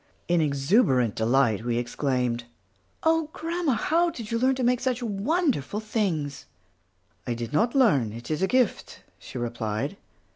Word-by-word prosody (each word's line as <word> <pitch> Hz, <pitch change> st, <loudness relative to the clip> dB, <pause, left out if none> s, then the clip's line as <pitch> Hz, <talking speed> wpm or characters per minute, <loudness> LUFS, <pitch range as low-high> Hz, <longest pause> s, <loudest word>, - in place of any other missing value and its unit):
In 175 Hz, -1 st, +3 dB
exuberant 140 Hz, -, +2 dB
delight 115 Hz, -2 st, +2 dB
we 120 Hz, -1 st, -1 dB
exclaimed, 120 Hz, -1 st, -1 dB, 0.6 s
"Oh, 320 Hz, -1 st, +2 dB
grandma, 335 Hz, -3 st, -1 dB
how 335 Hz, +8 st, +2 dB
did 235 Hz, -8 st, -8 dB
you 230 Hz, -, 0 dB
learn 260 Hz, +2 st, +3 dB
to 255 Hz, -, -2 dB
make 245 Hz, 0 st, +3 dB
such 255 Hz, -2 st, -1 dB
wonderful 225 Hz, -, 0 dB
things?" 185 Hz, -, -2 dB, 0.8 s
"I 120 Hz, -, -1 dB
did 115 Hz, +2 st, -6 dB
not 230 Hz, -, +2 dB
learn, 145 Hz, -, +4 dB
it 120 Hz, +6 st, -8 dB
is 155 Hz, -, -1 dB
a 190 Hz, -, +3 dB
gift," 255 Hz, -3 st, 0 dB, 0.2 s
she 130 Hz, -, -9 dB
replied. 120 Hz, -, -3 dB
175 Hz, 150 wpm, -26 LUFS, -, 0.8 s, learn